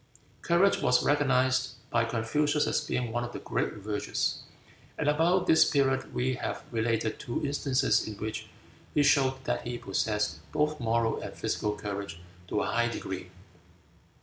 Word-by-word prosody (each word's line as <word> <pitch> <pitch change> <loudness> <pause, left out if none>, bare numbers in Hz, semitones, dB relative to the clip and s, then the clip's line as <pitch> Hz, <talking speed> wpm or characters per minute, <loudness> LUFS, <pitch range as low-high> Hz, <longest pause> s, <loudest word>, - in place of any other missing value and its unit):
Courage 175 +4 +3
was 125 - +3
recognized 130 -3 +2 0.2
by 120 -1 +2
Confucius 145 +7 +1
as - - +1
being 125 -2 -2
one 120 +1 -1
of 120 0 -6
the - - -5
great - - -2
virtues, 105 0 -2 0.6
and - - -1
about 165 +5 +3
this 160 - +6
period 135 -2 +1
we 130 +1 0
have 120 - -4
related 115 -1 0
two 120 - -3
instances 140 -4 +1
in 110 - -5
which 110 +2 -5 0.5
he 145 - +5
showed 135 -2 +3
that - - -1
he 120 0 -3
possessed 105 -5 -1
both 150 0 0
moral 115 -1 +1
and - - -7
physical 105 0 -1
courage 100 -4 -5 0.3
to 105 - 0
a - - 0
high 120 0 +1
degree. 95 -5 -5
120 Hz, 155 wpm, -29 LUFS, 110-145 Hz, 0.6 s, this